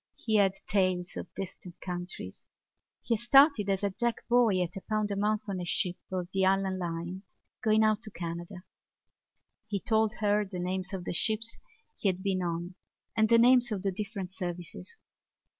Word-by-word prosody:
He 220 Hz, -2 st, +1 dB
had 195 Hz, -2 st, +4 dB
tales 185 Hz, -2 st, +1 dB
of -, -, -6 dB
distant 185 Hz, -2 st, -7 dB
countries. 175 Hz, -, -6 dB, 0.6 s
He 230 Hz, -, +1 dB
had -, -, -12 dB
started 270 Hz, -5 st, +6 dB
as 195 Hz, 0 st, 0 dB
a 200 Hz, -, +1 dB
deck 235 Hz, +4 st, -2 dB
boy 235 Hz, -6 st, +4 dB
at 175 Hz, +3 st, -6 dB
a 195 Hz, -, -5 dB
pound 215 Hz, -1 st, 0 dB
a -, -, -1 dB
month 210 Hz, +2 st, 0 dB
on 190 Hz, -2 st, -3 dB
a -, -, -3 dB
ship 175 Hz, +1 st, 0 dB
of 180 Hz, -2 st, -2 dB
the 195 Hz, 0 st, +2 dB
Allan 190 Hz, 0 st, +2 dB
Line 175 Hz, +1 st, -4 dB, 0.4 s
going 220 Hz, 0 st, +4 dB
out 215 Hz, 0 st, +2 dB
to 220 Hz, -, -5 dB
Canada. 175 Hz, +1 st, -6 dB, 1.0 s
He 205 Hz, -2 st, -2 dB
told 220 Hz, 0 st, +1 dB
her 210 Hz, -1 st, +2 dB
the 190 Hz, -2 st, -7 dB
names 185 Hz, +1 st, -2 dB
of 190 Hz, -3 st, -4 dB
the -, -, -2 dB
ships 220 Hz, +5 st, 0 dB, 0.4 s
he -, -, -1 dB
had 185 Hz, 0 st, -3 dB
been 190 Hz, -2 st, 0 dB
on 175 Hz, +1 st, -3 dB, 0.4 s
and 220 Hz, -1 st, +3 dB
the 235 Hz, -, +7 dB
names 245 Hz, 0 st, +5 dB
of 200 Hz, -3 st, -2 dB
the 195 Hz, -, +1 dB
different 195 Hz, -1 st, -5 dB
services. 175 Hz, -, -6 dB
195 Hz, 185 wpm, -30 LUFS, 180-215 Hz, 1.0 s, the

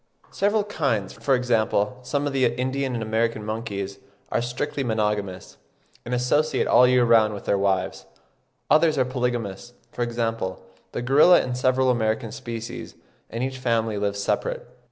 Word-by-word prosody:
Several 205 Hz, +1 st, +1 dB
kinds, 140 Hz, -, -1 dB
for 135 Hz, -2 st, +1 dB
example 120 Hz, -1 st, 0 dB
some 145 Hz, +3 st, -2 dB
of 145 Hz, -, -2 dB
the 130 Hz, -2 st, +3 dB
Indian 130 Hz, 0 st, -2 dB
and 115 Hz, -, -2 dB
American 110 Hz, 0 st, -1 dB
monkeys, 100 Hz, -3 st, -4 dB, 0.3 s
are -, -, +1 dB
strictly 125 Hz, +3 st, -3 dB
monogamous, 105 Hz, -, -2 dB, 0.5 s
and 125 Hz, +1 st, -2 dB
associate 145 Hz, +5 st, +1 dB
all 125 Hz, -, +6 dB
the -, -, +4 dB
year 125 Hz, -1 st, +4 dB
round 110 Hz, -2 st, +4 dB
with 100 Hz, -, -9 dB
their -, -, +2 dB
wives. 95 Hz, -1 st, -1 dB, 0.6 s
Others 155 Hz, -1 st, +4 dB
are 130 Hz, -, +3 dB
polygamous, 120 Hz, -4 st, -3 dB, 0.2 s
for -, -, -6 dB
example 115 Hz, -6 st, -2 dB, 0.3 s
the 120 Hz, -, -4 dB
gorilla 145 Hz, +8 st, +6 dB
and 125 Hz, -1 st, -3 dB
several 130 Hz, +1 st, +2 dB
American 110 Hz, -1 st, -1 dB
species, 115 Hz, -4 st, -7 dB, 0.3 s
and 115 Hz, +2 st, -3 dB
each 130 Hz, 0 st, -3 dB
family 115 Hz, -4 st, 0 dB
lives 100 Hz, 0 st, -1 dB
separate. -, -, -2 dB
120 Hz, 155 wpm, -24 LUFS, 110-130 Hz, 0.6 s, all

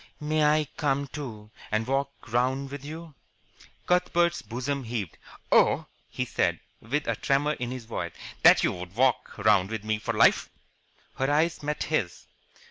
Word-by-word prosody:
"May 155 Hz, +1 st, +1 dB
I 150 Hz, 0 st, +3 dB
come, 140 Hz, -1 st, +1 dB
too, 115 Hz, -7 st, -8 dB, 0.2 s
and 110 Hz, +1 st, +1 dB
walk 135 Hz, +2 st, 0 dB, 0.2 s
round 130 Hz, +3 st, +1 dB
with 140 Hz, -1 st, -7 dB
you?" 160 Hz, +2 st, -8 dB, 0.7 s
Cuthbert's 175 Hz, -1 st, +2 dB
bosom 130 Hz, +4 st, -3 dB
heaved. 110 Hz, -7 st, -4 dB, 0.4 s
"Oh," -, -, +4 dB, 0.2 s
he -, -, -3 dB
said, -, -, 0 dB, 0.2 s
with 145 Hz, +7 st, -2 dB
a -, -, +1 dB
tremor 145 Hz, +2 st, +1 dB
in 125 Hz, -4 st, -4 dB
his 125 Hz, -2 st, -6 dB
voice, 115 Hz, -, -4 dB, 0.3 s
"that -, -, +7 dB
you -, -, +3 dB
would 90 Hz, +1 st, -8 dB
walk 130 Hz, +1 st, +1 dB
round 100 Hz, -2 st, +3 dB
with 110 Hz, -2 st, -4 dB
me 110 Hz, 0 st, -1 dB
for -, -, -3 dB
life!" -, -, +4 dB, 0.7 s
Her 135 Hz, +1 st, 0 dB
eyes 160 Hz, +3 st, +1 dB
met 150 Hz, 0 st, -2 dB
his. 115 Hz, -, -2 dB
135 Hz, 160 wpm, -27 LUFS, 110-150 Hz, 0.7 s, that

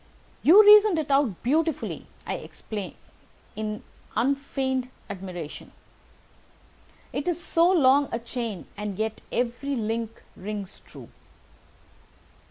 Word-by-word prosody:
"You 385 Hz, +8 st, +8 dB
reasoned 420 Hz, -3 st, +8 dB
it 300 Hz, -3 st, -2 dB
out 275 Hz, -9 st, +2 dB
beautifully," 310 Hz, +3 st, 0 dB, 0.2 s
I -, -, -2 dB
exclaimed 205 Hz, -4 st, -7 dB, 0.6 s
in 215 Hz, 0 st, -4 dB, 0.3 s
unfeigned 265 Hz, 0 st, 0 dB, 0.2 s
admiration. 180 Hz, -5 st, -7 dB, 1.4 s
"It 280 Hz, -, -3 dB
is 350 Hz, -2 st, 0 dB
so 335 Hz, 0 st, +3 dB
long 285 Hz, -5 st, +5 dB
a -, -, 0 dB
chain, 230 Hz, -4 st, -5 dB
and 205 Hz, -2 st, -5 dB
yet 220 Hz, 0 st, -2 dB
every 245 Hz, +4 st, -1 dB
link 225 Hz, 0 st, -3 dB
rings 200 Hz, 0 st, -6 dB
true." -, -, -12 dB
250 Hz, 105 wpm, -26 LUFS, 215-290 Hz, 1.4 s, You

